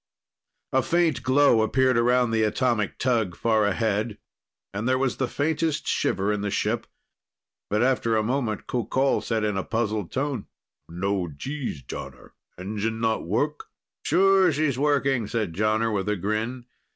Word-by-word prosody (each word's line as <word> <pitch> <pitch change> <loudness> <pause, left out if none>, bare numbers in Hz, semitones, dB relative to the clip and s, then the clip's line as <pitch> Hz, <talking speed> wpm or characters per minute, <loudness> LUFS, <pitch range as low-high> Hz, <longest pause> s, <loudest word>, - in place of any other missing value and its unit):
A 130 - +4
faint 165 -3 +1
glow 130 -3 +4
appeared 130 +3 +2
around 120 0 +3
the 110 -1 +1
atomic 110 -1 0
tug 115 -8 0
far 110 -1 +2
ahead, 105 +1 -1 0.6
and 110 +5 -2
there 130 - +3
was 130 -1 0
the 130 - 0
faintest 155 +2 -1
shiver 100 +2 0
in 105 - -2
the 105 - -1
ship. - - -1 0.8
But 105 +3 +1
after 120 -3 +2
a 110 - +1
moment, 120 -2 -1
Qoqol 130 +2 0
said 110 -2 -1
in 105 -2 0
a 95 - -1
puzzled 110 -4 -2
tone: 135 -5 -2 0.4
"No 95 +1 -1
Gs, 100 - -5
Jonner. 65 0 -9 0.3
Engine 105 +4 -3
not 110 -5 0
work?" 145 - -1 0.4
"Sure, 195 -1 +4
she's 145 -3 0
working," 140 -5 +1
said 105 -7 -2
Jonner 110 +3 +1
with 100 0 -1
a 105 - +1
grin. 110 +6 -3
115 Hz, 150 wpm, -25 LUFS, 105-130 Hz, 0.8 s, A